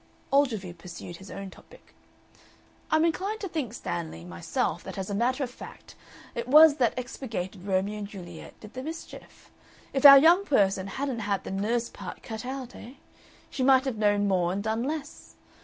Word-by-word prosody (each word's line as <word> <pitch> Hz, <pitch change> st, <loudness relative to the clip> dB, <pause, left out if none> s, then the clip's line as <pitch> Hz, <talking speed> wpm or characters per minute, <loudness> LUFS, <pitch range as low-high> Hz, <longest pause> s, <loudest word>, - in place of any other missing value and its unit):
Ogilvy 225 Hz, -11 st, +1 dB
pursued 175 Hz, 0 st, -10 dB
his 190 Hz, -, -13 dB
own 195 Hz, -1 st, -7 dB
topic. -, -, -18 dB, 1.0 s
"I'm 315 Hz, +1 st, +3 dB
inclined 390 Hz, +6 st, -1 dB
to 395 Hz, -, -3 dB
think, 305 Hz, -, -3 dB
Stanley, 85 Hz, -, -5 dB
myself 85 Hz, -1 st, -2 dB
that -, -, -8 dB
as 190 Hz, +1 st, -4 dB
a -, -, -2 dB
matter 250 Hz, +6 st, 0 dB
of 250 Hz, -, -4 dB
fact -, -, -12 dB, 0.4 s
it 235 Hz, 0 st, -4 dB
was 305 Hz, +2 st, +8 dB
the 245 Hz, -3 st, +3 dB
expurgated 215 Hz, -7 st, -6 dB
Romeo 195 Hz, +2 st, 0 dB
and 205 Hz, -, -5 dB
Juliet 175 Hz, -5 st, -11 dB
did 215 Hz, 0 st, -12 dB
the 255 Hz, -, -5 dB
mischief. 320 Hz, +4 st, -10 dB, 0.4 s
If 270 Hz, -, -1 dB
our 280 Hz, -1 st, +12 dB
young 335 Hz, +7 st, +6 dB
person 195 Hz, -, +2 dB
hadn't 265 Hz, +3 st, -3 dB
had 200 Hz, -3 st, -2 dB
the -, -, -6 dB
nurse 225 Hz, +5 st, -1 dB
part -, -, -9 dB
cut 220 Hz, +1 st, -6 dB
out, 260 Hz, -2 st, -6 dB
eh? 240 Hz, -, -11 dB, 0.6 s
She -, -, -4 dB
might 260 Hz, 0 st, +5 dB
have 260 Hz, -5 st, -2 dB
known 205 Hz, -1 st, +2 dB
more 180 Hz, -3 st, +1 dB
and 200 Hz, +2 st, -3 dB
done 220 Hz, +1 st, -1 dB
less. 295 Hz, +3 st, -5 dB
230 Hz, 180 wpm, -27 LUFS, 195-275 Hz, 1.0 s, our